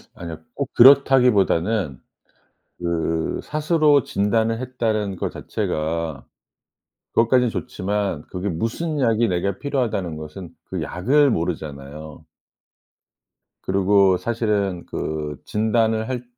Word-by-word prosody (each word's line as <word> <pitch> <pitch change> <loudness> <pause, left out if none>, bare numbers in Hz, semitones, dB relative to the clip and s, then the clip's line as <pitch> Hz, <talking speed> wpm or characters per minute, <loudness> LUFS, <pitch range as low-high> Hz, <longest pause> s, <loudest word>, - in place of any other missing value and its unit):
아니요 85 -2 -7 0.2
꼭 140 - -3
그렇다기보다는 115 - +4 0.8
그 80 -2 -1
스스로 150 -2 +2
진단을 110 +3 0
했다라는 110 -6 -2
거 - - -2
자체가 80 -1 -3 0.9
그것까지는 120 +1 +3
좋지만 100 -8 -3
그게 95 +2 -3
"무슨 140 - -2
약이 115 -2 +2
내가 95 +2 -1
필요하다."는 110 - -2
것은 80 +3 -8 0.2
그 - - -5
약을 140 +10 +2
모르잖아요. 75 -3 -5 1.4
그리고 95 0 +3
사실은 105 -6 -1
그 75 -2 -4
진단을 110 0 +1
할 125 -1 -3
100 Hz, 250 characters per minute, -22 LUFS, 85-120 Hz, 1.4 s, 그렇다기보다는